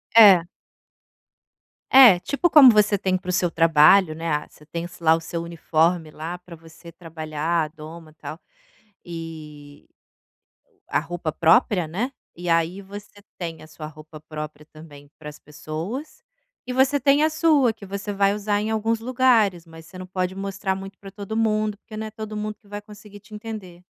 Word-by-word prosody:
É. 195 -7 +8 1.4
É, 250 -9 +8
tipo 280 - 0
como 295 -5 +9
você 210 -2 +4
tem 185 -1 0
para 180 0 -9
o - - +2
seu 180 -1 +1
trabalho, 165 +2 +5
né. 165 +1 -5
Ah 150 -1 -1
você 150 - -20
tem 170 +1 -5
lá 160 -1 +4
o 165 - -5
seu 165 +1 -5
uniforme 165 -1 0
lá 165 +4 -6
para 180 -1 -13
você 165 +1 -15
trabalhar, 160 0 -3
a 155 - -3
doma 155 0 -12
tal, 160 - -8 0.6
e 155 -4 -10 1.0
a - - +1
roupa 165 0 -4
própria, 175 - +3
né. 225 - -3 0.2
E 175 0 -6
aí 165 +4 +1
você 205 +1 -12 0.2
tem 165 -2 -6
a 155 - -13
sua 155 0 -10
roupa 155 0 -12
própria 150 -1 -8
também 145 -2 -14
para 150 -1 -9
as 150 - -12
pessoas, 160 - -7 0.4
e 250 - -3
você 270 +2 +2
tem 280 +3 +3
a 315 - +3
sua 305 -6 +3
que 215 -2 -13
você 200 +2 -5
vai 200 0 +2
usar 205 0 -1
em 220 +1 -2
alguns 220 +1 0
lugares, 230 -8 +2
mas 165 0 -13
você 185 +3 -12
não 185 - -8
pode 185 0 -2
mostrar 195 0 -3
muito 195 0 -9
para 195 -1 -12
todo 205 +2 -6
mundo, 215 -2 0
porque 215 - -13
não 220 0 -5
é - - -10
todo 215 0 -7
mundo 210 0 -4
que 205 - -26
vai 205 0 -7
conseguir 205 0 -14
te 210 +2 -18
entender. 210 -5 -9
180 Hz, 185 wpm, -23 LUFS, 160-210 Hz, 1.4 s, como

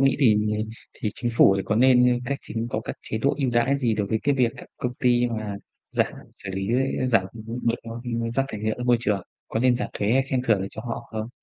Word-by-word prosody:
nghĩ 135 0 +4
thì 115 -6 +6 0.6
thì 110 - -2
Chính 120 -1 -2
phủ 95 - +7
thì 95 - -1
có 105 - 0
nên, 125 0 +6
ơ, 120 - +2
cách 140 +2 -2
chính 115 +1 -3
có 110 - -1
các - - -6
chế 110 - -3
độ 140 +5 +2
ưu 135 -3 +1
đãi 120 +4 +2
gì 120 -5 +1
đối 105 -1 -1
với 110 +3 0
cái 145 - +2
việc 125 -3 +2
các - - -10
công 125 - -2
ty 120 -2 +3
mà 110 -3 -4 0.3
giảm, - - +1 0.2
xử 95 - -8
lý 95 +1 -2 0.4
giảm, 115 -7 +3 0.2
ừm, 115 +2 -4
được, 115 - +2
ơ, 115 - -9
ưm, 115 -1 -2
rác 135 +3 +1
thải 110 -5 -6
nhựa 110 0 0
ra 125 - -3
môi 125 -1 +5
trường? 105 -4 0 0.3
Có 110 - -1
nên 125 0 +4
giảm 125 - -3
thuế 105 +2 0
hay 135 +2 +4
khen 130 -1 -1
thưởng 110 -6 +3
gì 95 - -4
cho 110 - -7
họ 115 - -5
không? 110 0 -4
115 Hz, 270 wpm, -25 LUFS, 110-125 Hz, 0.6 s, phủ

